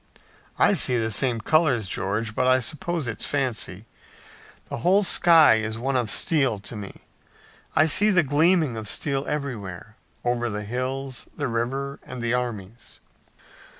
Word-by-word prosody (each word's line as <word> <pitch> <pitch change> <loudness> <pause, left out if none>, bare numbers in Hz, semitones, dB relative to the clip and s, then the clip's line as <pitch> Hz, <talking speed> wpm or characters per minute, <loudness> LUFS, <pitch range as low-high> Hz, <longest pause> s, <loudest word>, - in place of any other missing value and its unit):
"I - - +4
see 125 - +1
the 110 -1 -1
same 115 +1 0
colors, 135 - +2
George, 105 +4 -2
but 125 +3 0
I 130 0 +5
suppose 160 +3 -3
it's 110 -2 -5
fancy. 115 -7 -3 0.8
The - - -5
whole 190 - +3
sky 165 - +6
is 110 0 -3
one 135 +3 -2
of 120 -4 0
steel 135 - +2
to 100 +4 -9
me. 100 -2 -9 0.7
I 155 - +5
see 195 +7 +4
the 185 -5 +4
gleaming 155 -2 +2
of 110 -1 -5
steel 140 -1 -1
everywhere, 110 -7 -5 0.3
over 120 0 0
the 105 -1 -4
hills, 130 +3 -4
the 145 - -1
river 135 +4 -3
and 125 - -8
the 120 0 -1
armies." 115 -3 -5
125 Hz, 150 wpm, -24 LUFS, 110-145 Hz, 0.8 s, sky